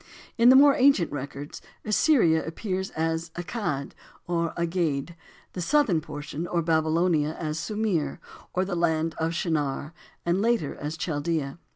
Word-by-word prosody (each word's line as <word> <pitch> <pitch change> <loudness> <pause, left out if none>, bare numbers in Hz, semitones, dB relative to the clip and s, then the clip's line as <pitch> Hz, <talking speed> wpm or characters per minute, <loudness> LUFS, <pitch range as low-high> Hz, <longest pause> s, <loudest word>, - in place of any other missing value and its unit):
In 235 +1 +6
the 260 - +8
more 280 +1 +8
ancient 260 - +4
records 140 +1 -6 0.2
Assyria 210 - +3
appears 190 +3 -3
as 160 +1 -1
"Accad," 175 -6 -3 0.3
or 170 -1 -1
"Agade;" 170 -3 -1 0.4
the 180 - -4
southern 215 - +2
portion, 150 +3 -6
or 170 -1 0
Babylonia, 160 -1 +1
as 155 -1 -3
"Sumir," 205 -10 -1 0.3
or 185 +1 0
the 190 - -4
land 165 -1 +1
of 165 +1 -1
"Shinar," 150 -3 -1 0.3
and 175 +3 +1
later 230 -10 +1
as 150 +2 -5
Chaldea. 155 -2 -2
165 Hz, 140 wpm, -26 LUFS, 155-185 Hz, 0.4 s, the